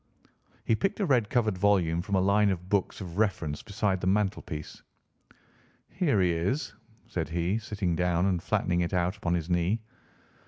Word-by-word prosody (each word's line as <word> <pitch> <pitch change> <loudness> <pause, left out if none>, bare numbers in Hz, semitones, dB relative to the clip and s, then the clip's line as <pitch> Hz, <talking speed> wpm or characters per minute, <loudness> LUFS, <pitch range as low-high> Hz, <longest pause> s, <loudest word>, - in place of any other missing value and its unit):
He - - +2
picked 195 - -1
a 200 - +2
red 125 - +2
covered 110 -6 +1
volume 90 -5 +2
from 100 +2 -2
a 95 - +3
line 100 +2 +3
of 90 -1 -3
books 100 0 0
of 90 0 -6
reference 85 -9 0
beside 100 -3 -1
the - - -1
mantelpiece. 95 -6 -1 1.1
"Here 150 - +1
he 90 -1 +3
is," 90 - -1 0.3
said 80 -3 -3
he, 85 +6 0
sitting 100 -5 -2
down 90 0 +1
and 90 -3 +1
flattening 90 +1 0
it 85 +2 -1
out 90 +2 +1
upon 90 -4 -1
his 85 -2 -2
knee. 90 +5 +1
95 Hz, 170 wpm, -28 LUFS, 85-105 Hz, 1.1 s, a